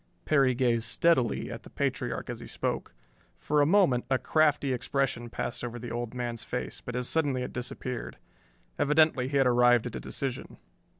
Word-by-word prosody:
Perry 135 -4 +3
gazed 120 -2 +1
steadily 130 -1 +1
at - - -7
the - - -14
patriarch - - -2
as - - -7
he - - -9
spoke. - - -3 0.4
For 150 0 +1
a 145 - +4
moment, 165 -10 +4
a 130 - +3
crafty 145 0 +2
expression 125 -2 -1
passed 120 - -4
over 120 0 -4
the 120 0 -7
old 120 0 -4
man's 120 -2 -3
face, 125 - -5
but 120 - -6
as 125 0 -1
suddenly 140 -6 +1
it - - -6
disappeared. 125 0 -5 0.6
Evidently 150 -3 +3
he 140 +1 0
had 135 - +4
arrived 120 -1 +4
at 120 - -5
a - - -3
decision. 130 -2 -5
125 Hz, 180 wpm, -29 LUFS, 120-140 Hz, 0.6 s, a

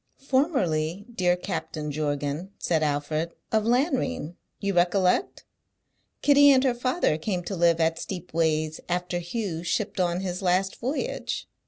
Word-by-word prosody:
"Formerly, 205 - 0
dear 180 -4 +2
Captain 155 -5 -4
Jorgan," 145 +3 -2
said 165 -3 0
Alfred, 155 +2 -1 0.2
"of 220 -1 +2
Lanrean, 250 - 0 0.2
you 200 0 -1
recollect? 180 - +2 0.8
Kitty 285 0 +7
and 265 -2 +5
her 260 -3 +3
father 250 - 0
came 180 +1 -2
to 195 - -4
live 170 -1 +3
at 165 0 +1
Steepways 160 -4 -1
after 175 0 -1
Hugh 175 -2 -3
shipped 195 +3 -2
on 175 0 +1
his 180 -1 -3
last 190 +1 +1
voyage." 260 +6 -3
180 Hz, 135 wpm, -26 LUFS, 160-220 Hz, 0.8 s, Kitty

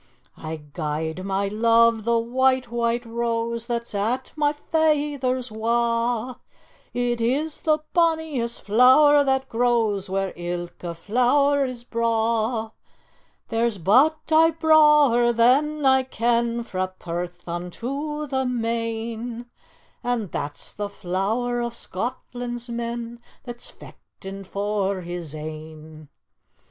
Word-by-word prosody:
"I 160 0 -6 0.2
gie'd 160 +2 -3
my 195 +1 -1
love 230 +1 +3
the 235 0 +3
white, 255 +1 +1
white 235 0 0
rose 230 0 -2
That's 235 -2 -3
at 215 +5 -2
my 295 -1 +2
feyther's 290 -5 0
wa', 235 +2 0 0.6
It 240 -1 -1
is 285 +7 -1
the 310 -1 +3 0.2
bonniest 320 -8 0
flower 260 +7 +6
that 265 -1 0
grows 225 -5 +1
Where 195 0 -1
ilka 175 0 -5
flower 275 - +2
is 250 -2 -6
braw; 225 -1 0 0.8
There's 230 -2 0
but 255 - +4
ae 320 +1 +6
brawer 300 -7 +5
that 280 +6 +3
I 265 0 +5
ken 235 -1 0
Frae 185 -4 -2
Perth 175 +1 -6
unto 265 - -4
the 265 -2 -1
main, 230 0 -3 0.6
And 235 -6 -1
that's 145 0 -5
the 205 -1 -4
flower 210 +7 -1
o' 235 - -1
Scotland's 240 +2 -5
men 235 0 -4 0.2
That's 240 -2 -8
fechtin' 195 0 -11
for 200 -1 -1
his 170 -3 -6
ain. 155 0 -9
235 Hz, 110 wpm, -24 LUFS, 200-255 Hz, 0.8 s, flower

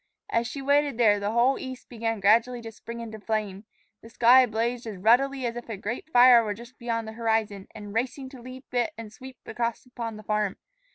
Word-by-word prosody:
As 230 0 +1
she 275 +2 -6
waited 285 -2 +2
there, 210 -4 +4
the 200 0 -2
whole 240 +4 +2
east 260 -1 -8
began 225 -2 -3
gradually 230 +5 +3
to 225 - -7
spring 235 +1 -9
into 220 -2 -8
flame. 210 -2 -3 0.4
The 225 - -13
sky 245 +2 +6
blazed 235 +2 -2
as 210 -3 -6
ruddily 255 +6 +3
as 235 0 -2
if 240 0 -8
a 220 - -4
great 230 +9 -5
fire 245 -3 +7
were 210 -2 -3
just 240 +3 -14
beyond 230 -2 -3
the - - -6
horizon 220 -3 -1
and 205 -2 -9
racing 260 +3 -2
to 260 -2 -12
leap 255 +2 -12
it 245 -2 0
and 220 -2 -9
sweep 260 +2 -11
across 235 +2 -3
upon 235 -3 -6
the 215 - -11
farm. 210 -2 -1
230 Hz, 215 wpm, -26 LUFS, 220-250 Hz, 0.4 s, fire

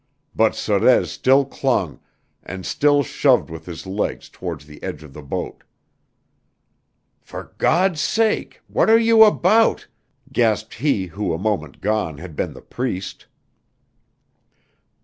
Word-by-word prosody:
But 110 0 +3
Sorez 110 +4 +2
still 135 +2 +3
clung 120 - -1 0.4
and 95 -1 -8
still 145 -1 +2
shoved 130 - +2
with 80 0 -9
his 85 0 -8
legs 95 +2 -3
towards - - -7
the 75 0 -14
edge 75 - -6
of 75 -3 -14
the 75 - -9
boat. 70 - -5 1.6
"For - - -10
God's 175 -1 +2
sake 220 -1 0
what - - +1
are 225 - +7
you 225 -1 +6
about?" 215 +1 +3 0.5
gasped 110 -2 +1
he 115 -6 0
who 90 0 -3
a - - -2
moment 95 -7 -3
gone 105 -7 -1
had 85 0 -10
been - - -3
the - - -13
Priest. 110 -7 -5
110 Hz, 130 wpm, -21 LUFS, 90-145 Hz, 1.6 s, are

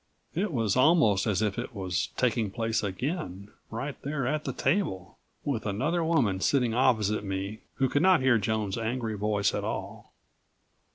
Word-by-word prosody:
It 195 +4 -1
was 115 -8 +1
almost 130 - +4
as 105 0 +1
if 105 +1 -1
it 120 0 -6
was 95 -2 -1
taking 115 -4 +1
place 115 +2 -1
again, 100 - -4 0.2
right 130 +5 -4
there 140 -2 -2
at 150 +4 -1
the 135 - -1
table, 130 - -1 0.3
with 130 -7 -1
another 150 - 0
woman 135 - +2
sitting 125 +1 +2
opposite 110 -4 +2
me 100 +2 -4 0.2
who 135 - +2
could 145 +3 +1
not 185 0 +5
hear 130 -3 +4
Joan's 105 0 -1
angry 115 -1 -2
voice 105 -1 +1
at - - -2
all. - - -5
115 Hz, 165 wpm, -28 LUFS, 100-140 Hz, 0.3 s, not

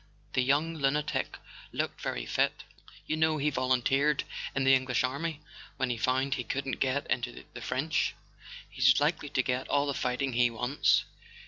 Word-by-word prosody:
The 130 - +3
young 150 +6 +1
lunatic 145 +1 0 0.3
looked - - -3
very - - -3
fit. - - 0 0.4
You 155 - -1
know 160 0 +2
he 150 +1 +1
volunteered 135 +3 +2 0.3
in 135 - +1
the 135 0 +6
Eng¬ 130 0 0
lish 125 -1 +1
army 145 +4 -2 0.4
when 130 -2 0
he 120 - -2
found 130 +3 +1
he 125 - -2
couldn't 135 +1 -3
get 135 +1 0
into 125 0 -3
the - - -8
French. - - 0 0.5
He's 130 +1 +4
likely 150 0 0
to 130 - +1
get 125 0 -1
all 145 0 +2
the 140 - -1
fighting 125 +1 -1
he 120 0 +4
wants." 125 +5 +2
135 Hz, 175 wpm, -30 LUFS, 125-145 Hz, 0.5 s, the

